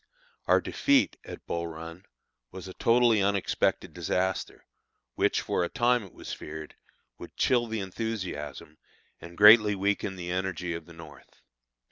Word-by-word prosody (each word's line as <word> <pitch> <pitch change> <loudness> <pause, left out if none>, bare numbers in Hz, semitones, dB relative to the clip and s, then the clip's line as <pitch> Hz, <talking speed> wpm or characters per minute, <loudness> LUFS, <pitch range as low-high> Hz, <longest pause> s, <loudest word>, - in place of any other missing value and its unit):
Our - - +4
defeat 280 -1 +2
at - - -10
Bull 85 0 -3
Run 85 +3 -10 0.4
was 95 0 -9
a 95 - -8
totally 115 -1 +3
unexpected 100 -1 0
disaster, 95 0 -2 0.5
which, - - +1
for - - -1
a 85 - -2
time, 120 0 +2
it 95 - -13
was - - -8
feared, 75 0 -8 0.5
would - - -11
chill 120 -2 +2
the 110 -2 -3
enthusiasm 90 -8 -5 0.4
and 85 0 -12
greatly 105 0 +8
weaken 100 0 -1
the 90 -1 -6
energy 90 -1 -3
of 85 0 -7
the 85 - -13
North. 80 -4 -15
95 Hz, 145 wpm, -28 LUFS, 85-105 Hz, 0.5 s, greatly